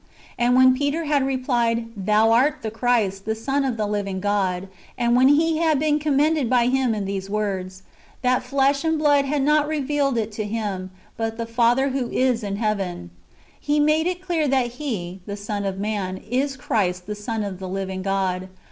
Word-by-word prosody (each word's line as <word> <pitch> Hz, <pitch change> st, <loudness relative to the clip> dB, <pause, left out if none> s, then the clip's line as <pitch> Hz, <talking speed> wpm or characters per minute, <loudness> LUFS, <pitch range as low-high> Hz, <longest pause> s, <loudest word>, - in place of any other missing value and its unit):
"^ -, -, -36 dB, 0.3 s
and 240 Hz, +1 st, +2 dB
when 260 Hz, 0 st, +6 dB
Peter 285 Hz, +4 st, -1 dB
had 295 Hz, -2 st, +2 dB
rephed, 265 Hz, -1 st, -2 dB
^' 235 Hz, -3 st, +1 dB
Thou 210 Hz, +3 st, +3 dB
art 260 Hz, +5 st, +2 dB
the 220 Hz, -, -3 dB
Christ, 220 Hz, -5 st, 0 dB
the 220 Hz, +1 st, -1 dB
Son 270 Hz, +5 st, -1 dB
of 255 Hz, -4 st, -1 dB
the 215 Hz, -, 0 dB
living 200 Hz, -2 st, -2 dB
God;" 195 Hz, -2 st, -1 dB, 0.3 s
and 240 Hz, 0 st, +2 dB
when 255 Hz, +1 st, +5 dB
he 315 Hz, +3 st, +3 dB
had 320 Hz, -3 st, +3 dB
been 300 Hz, 0 st, +2 dB
commended 300 Hz, -2 st, +1 dB
by 245 Hz, -2 st, +3 dB
Him 260 Hz, -3 st, +1 dB
[in 205 Hz, -2 st, -3 dB
these 195 Hz, 0 st, -4 dB
words], 190 Hz, -3 st, -3 dB, 0.2 s
" -, -, -29 dB
That 250 Hz, 0 st, +2 dB
flesh 275 Hz, +1 st, +1 dB
and 320 Hz, -1 st, +1 dB
blood 290 Hz, -2 st, +3 dB
had 280 Hz, 0 st, 0 dB
not 300 Hz, +1 st, +3 dB
revealed 290 Hz, -3 st, 0 dB
it 220 Hz, -1 st, -1 dB
to 215 Hz, +1 st, -4 dB
him, 205 Hz, -3 st, -3 dB, 0.3 s
but 225 Hz, 0 st, -3 dB
the 230 Hz, -, -3 dB
Father 240 Hz, +4 st, +2 dB
who 260 Hz, -2 st, -2 dB
is 255 Hz, -2 st, +1 dB
in 200 Hz, -2 st, -3 dB
heaven," 195 Hz, -, -2 dB, 0.5 s
He 295 Hz, 0 st, 0 dB
made 305 Hz, +2 st, +3 dB
it 360 Hz, 0 st, -3 dB
clear 335 Hz, -5 st, 0 dB
that 260 Hz, -3 st, +1 dB
He, 190 Hz, -10 st, -4 dB
the 200 Hz, 0 st, -5 dB
Son 205 Hz, 0 st, -4 dB
of 190 Hz, -1 st, -2 dB
man, 200 Hz, -2 st, -2 dB
is 265 Hz, +3 st, -1 dB
Christ 180 Hz, -7 st, -1 dB
the 210 Hz, -, -4 dB
Son 215 Hz, +1 st, -3 dB
of 195 Hz, -3 st, -5 dB
the 190 Hz, -1 st, -6 dB
living 190 Hz, 0 st, -4 dB
God. 190 Hz, -1 st, -1 dB
230 Hz, 205 wpm, -23 LUFS, 200-275 Hz, 0.5 s, when